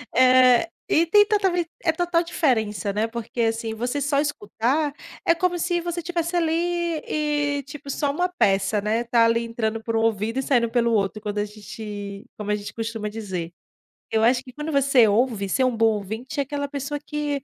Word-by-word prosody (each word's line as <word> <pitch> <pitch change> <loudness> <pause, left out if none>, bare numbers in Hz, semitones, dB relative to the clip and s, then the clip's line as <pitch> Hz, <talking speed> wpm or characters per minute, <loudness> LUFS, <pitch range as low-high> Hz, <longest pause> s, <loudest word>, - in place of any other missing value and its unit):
Eh, 255 +3 +6 0.2
e 330 +2 +4
tem 415 +5 +6
totalmen 385 -5 +1 0.2
É 325 - +5
total 345 0 +1
diferença, 220 - 0
né, 215 +2 0
porque 235 +1 -7
assim, 225 0 0
você 245 +5 -2
só 280 0 +1
escutar, 285 +1 -1 0.3
é 335 - +5
como 360 0 0
se 350 +1 0
você 345 0 -3
estivesse 340 0 -2
ali 330 -2 +2 0.6
e, 295 -2 0
tipo, 285 -1 -10
só 280 +1 0
uma 355 +5 0
peça, 205 - +1
né, 220 +3 0
tá 235 0 +3
ali 230 0 +2
entrando 225 -1 -2
por 230 0 -2
um 225 - +2
ouvido 225 +2 0
e 270 - -1
saindo 240 -4 +2
pelo 235 0 +1
outro 205 0 0
quando 210 -1 -4
a 205 - 0
gente 205 -1 -8
como 210 -1 -3
a 210 - +3
gente 205 0 -7
costuma 225 -1 -4
dizer. 190 -6 -5 0.6
Eu 220 0 +2
acho 245 +2 +4
que 255 - -13
quando 300 +3 -5
você 275 -4 +5
ouve, 210 -2 +1
ser 260 +5 +2
um 250 - +1
bom 225 0 +4
ouvinte 220 +8 -5
é 280 - +3
aquela 285 +1 -3
pessoa 285 +1 -4
que, 295 -2 -3
245 Hz, 195 wpm, -24 LUFS, 220-295 Hz, 0.6 s, Eh